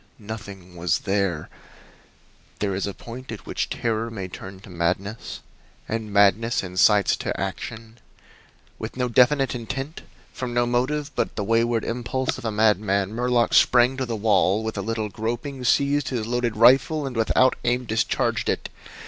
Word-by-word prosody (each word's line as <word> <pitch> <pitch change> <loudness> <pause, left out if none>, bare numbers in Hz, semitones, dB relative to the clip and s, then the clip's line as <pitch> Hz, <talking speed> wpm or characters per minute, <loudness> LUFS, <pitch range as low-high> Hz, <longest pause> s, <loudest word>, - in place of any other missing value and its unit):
Nothing 100 -4 -9
was 85 0 0
there! 95 -6 -1 1.1
There 100 -2 -1
is 95 +2 -2
a 100 - -4
point 125 +1 -9
at 110 - -8
which - - -2
terror 115 0 -1
may 100 -5 -5
turn 95 +1 -9
to 105 - -14
madness; 90 +5 -2 0.5
and 110 -1 -3
madness 105 +3 +3
incites 95 +2 +3
to - - -3
action. 110 +5 -6 0.8
With - - -6
no 125 -1 0
definite 130 +3 +3
intent, 135 +6 -5 0.3
from 125 -2 -4
no 120 0 +3
motive 135 +5 0
but - - -1
the 105 - -2
wayward 115 +1 +1
impulse 125 +2 -2
of - - -10
a 110 - 0
madman, 105 -2 +2
Murlock 120 0 +1
sprang 125 +1 +5
to 130 -2 -2
the 115 - -2
wall, 105 -1 +2
with 110 0 -3
a - - -2
little 110 -1 -2
groping 120 +5 -4
seized 140 +3 +2
his 120 -5 -2
loaded 120 -1 -1
rifle, 135 +6 +5
and 130 -2 -5
without 120 +3 +3
aim 125 +1 0
discharged 110 0 0
it. - - -2
115 Hz, 160 wpm, -24 LUFS, 100-125 Hz, 1.1 s, sprang